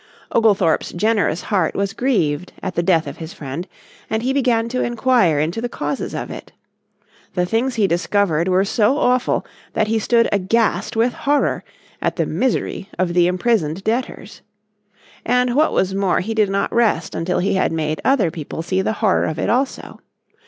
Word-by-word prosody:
Oglethorpe's 200 -7 +2
generous 200 -3 +1
heart 185 -6 0
was 200 +1 -1
grieved 185 - 0
at 185 - -3
the 170 - 0
death 170 -2 +2
of - - -7
his 165 +3 -8
friend, 160 0 -6 0.4
and 220 +1 -1
he 260 +2 0
began 240 -4 +1
to 255 +2 -2
enquire 240 - +2
into 165 +9 -1
the 245 - -2
causes 275 - -4
of - - -5
it. - - -9 0.8
The 180 -1 +1
things 230 +7 0
he 215 -3 +2
discovered 175 -2 +1
were 185 +1 +3
so 215 +6 +2
awful 250 -3 +1 0.3
that 215 - 0
he 225 0 +1
stood 230 +2 +3
aghast 200 0 +1
with 230 +2 +2
horror 290 +1 0 0.4
at - - 0
the - - 0
misery 240 -5 -1
of 175 -1 0
the 175 0 +4
imprisoned 180 -3 0
debtors. 225 -1 -3 0.8
And 250 +1 +2
what 305 +4 +3
was 190 0 +1
more 195 -2 +1
he 220 +5 -3
did 215 -2 +2
not 195 0 -1
rest 235 -2 +1
until 170 +2 -1
he 195 +3 +1
had 190 - +1
made 155 -1 -2
other 235 -11 +2
people 160 0 -6
see 185 +2 0
the 205 - -1
horror 190 - +3
of 160 - -3
it 200 - 0
also. 260 +3 -2
200 Hz, 180 wpm, -20 LUFS, 175-235 Hz, 0.8 s, the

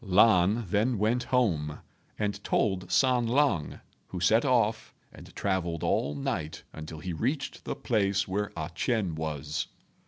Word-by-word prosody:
Lan 105 +1 +4
then 105 +6 +1
went 115 +5 +1
home 80 - +1 0.4
and 105 -1 -2
told 95 -3 0
San 125 +4 +3
lang, 115 - +1 0.3
who 90 - -5
set 110 +6 +4
off 115 -5 +1 0.2
and - - -13
travelled 90 -4 -1
all 75 - +1
night 75 +2 -3
until 80 0 -8
he 90 +3 -5
reached 135 - -2
the - - -3
place 100 -4 +1
where 100 +2 -2
A 80 +1 -4
ch'ien 105 -5 0
was. 75 -1 -3
100 Hz, 145 wpm, -29 LUFS, 85-115 Hz, 0.4 s, Lan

